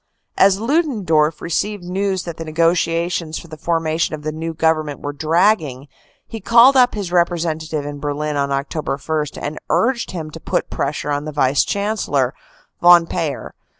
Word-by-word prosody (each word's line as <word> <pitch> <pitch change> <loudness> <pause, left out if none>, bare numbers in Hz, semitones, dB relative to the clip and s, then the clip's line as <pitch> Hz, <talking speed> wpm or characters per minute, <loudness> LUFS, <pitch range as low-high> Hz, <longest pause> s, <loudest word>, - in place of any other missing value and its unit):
"As 195 0 +4
LudendorfT 210 - +1
received 195 +4 -2
news 190 0 -2
that 170 -2 -7
the 165 - -5
negotiations 165 0 0
for 170 - -10
the 155 - -8
formation 165 -1 -1
of 150 - -12
the 155 - -2
new 160 +1 -5
Government 155 -2 0
were 145 - -5
dragging, 155 -3 +1 0.4
he 225 - -7
called 235 +6 +6
up 250 -2 +4
his 200 -4 -4
representative 165 -3 0
in 145 0 -6
Berlin 150 +1 -3
on 140 -1 0
Oct. 140 +1 -3 0.3
1, - - -8
and 150 - -6
urged 240 -1 +1
him 160 -4 -6
to 165 - -9
put - - -2
pressure 145 +1 -2
on 145 +1 -2
the 155 - -4
Vice 140 -1 +2
Chancellor, 200 - -1 0.5
Von 175 -1 +7
Payer. 155 -3 -4
165 Hz, 165 wpm, -19 LUFS, 150-185 Hz, 0.5 s, Von